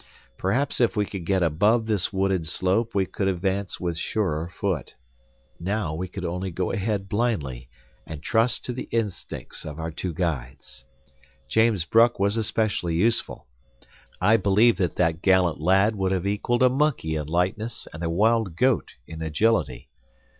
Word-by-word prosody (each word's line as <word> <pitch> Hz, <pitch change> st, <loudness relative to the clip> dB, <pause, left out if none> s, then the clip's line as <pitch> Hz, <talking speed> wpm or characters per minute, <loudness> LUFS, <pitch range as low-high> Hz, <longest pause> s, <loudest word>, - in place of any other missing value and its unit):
Perhaps 125 Hz, +9 st, 0 dB
if 115 Hz, -2 st, +2 dB
we 105 Hz, -, +2 dB
could 95 Hz, -4 st, -7 dB
get 95 Hz, -2 st, +2 dB
above 105 Hz, +9 st, +2 dB
this 105 Hz, -4 st, 0 dB
wooded 95 Hz, -4 st, 0 dB
slope 100 Hz, +7 st, 0 dB
we 95 Hz, -1 st, +2 dB
could 95 Hz, +1 st, -2 dB
advance 95 Hz, +1 st, -1 dB
with 85 Hz, -2 st, -2 dB
surer 85 Hz, -8 st, -1 dB
foot. 90 Hz, -4 st, -3 dB, 0.6 s
Now, 95 Hz, -2 st, -2 dB
we 90 Hz, +4 st, -3 dB
could 90 Hz, 0 st, -6 dB
only 90 Hz, +3 st, -3 dB
go 90 Hz, +1 st, -2 dB
ahead 100 Hz, -1 st, -2 dB
blindly, 75 Hz, -, -2 dB, 0.4 s
and 80 Hz, -1 st, -7 dB
trust 115 Hz, +7 st, +1 dB
to 125 Hz, -, -3 dB
the 125 Hz, -, -6 dB
instincts 110 Hz, -5 st, -4 dB
of 75 Hz, +1 st, -7 dB
our 80 Hz, +1 st, -3 dB
two 90 Hz, +3 st, -4 dB
guides. 70 Hz, -6 st, -4 dB, 0.6 s
James 110 Hz, -6 st, +2 dB
Bruck 115 Hz, +5 st, +4 dB
was 100 Hz, +2 st, +2 dB
especially 110 Hz, -6 st, -1 dB
useful. 110 Hz, +7 st, +1 dB, 0.7 s
I 105 Hz, +5 st, +4 dB
believe 105 Hz, +3 st, +4 dB
that 90 Hz, -4 st, -1 dB
that 80 Hz, -2 st, +1 dB
gallant 90 Hz, -4 st, +3 dB
lad 95 Hz, +6 st, +3 dB
would 95 Hz, -1 st, 0 dB
have 95 Hz, -1 st, -1 dB
equaled 105 Hz, +5 st, 0 dB
a 130 Hz, -, +6 dB
monkey 130 Hz, -, 0 dB
in 75 Hz, -2 st, -3 dB
lightness 95 Hz, +8 st, -1 dB
and 75 Hz, -, -8 dB
a 85 Hz, -, -1 dB
wild 105 Hz, +1 st, +2 dB
goat 125 Hz, +4 st, +1 dB
in 80 Hz, 0 st, -9 dB
agility. 80 Hz, -, 0 dB
95 Hz, 160 wpm, -25 LUFS, 85-110 Hz, 0.7 s, a